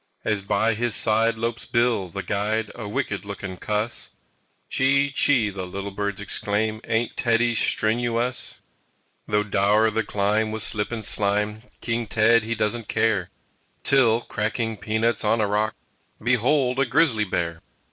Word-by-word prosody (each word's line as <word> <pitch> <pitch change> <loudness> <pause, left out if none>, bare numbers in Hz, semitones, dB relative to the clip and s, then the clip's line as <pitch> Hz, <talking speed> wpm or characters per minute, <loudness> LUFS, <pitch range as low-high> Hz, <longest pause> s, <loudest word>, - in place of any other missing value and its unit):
As 105 -2 0
by 105 +3 +1
his 115 0 +1
side 115 +1 +3
lopes 115 +1 -3
Bill, 115 -6 0
the 100 +3 -6
Guide, 105 +2 -2
A 115 -3 -7
wicked 105 -3 -3
looking 100 -2 -7
cuss 105 +5 -2 0.5
"Chee 140 +1 +2
chee!" 125 -7 +4
the 95 -2 -6
little 100 +2 -6
birds 100 0 -3
exclaim, 105 +2 -2
"Ain't 115 +1 -1
Teddy 120 0 +2
stren 110 +1 +2
oo 120 -1 -1
uss!" 125 +2 -3 0.7
Though 105 0 +1
dour 105 +2 +2
the 110 - 0
climb 105 +2 0
with 110 0 +1
slip 105 +1 +2
and 110 -3 -4
slime, 105 +1 0 0.2
King 115 -1 -2
Ted 115 +2 +3
he 115 +1 -2
doesn't 105 +1 -2
care, 105 -6 0 0.5
Till, 120 -4 +4
cracking 110 0 -2
peanuts 110 +2 0
on 110 +2 +2
a 110 - +2
rock, 105 +1 0 0.4
Behold, 125 +3 +1
a 135 - +2
Grizzly 120 -5 +2
Bear! 85 -3 -3
110 Hz, 155 wpm, -23 LUFS, 105-115 Hz, 0.7 s, chee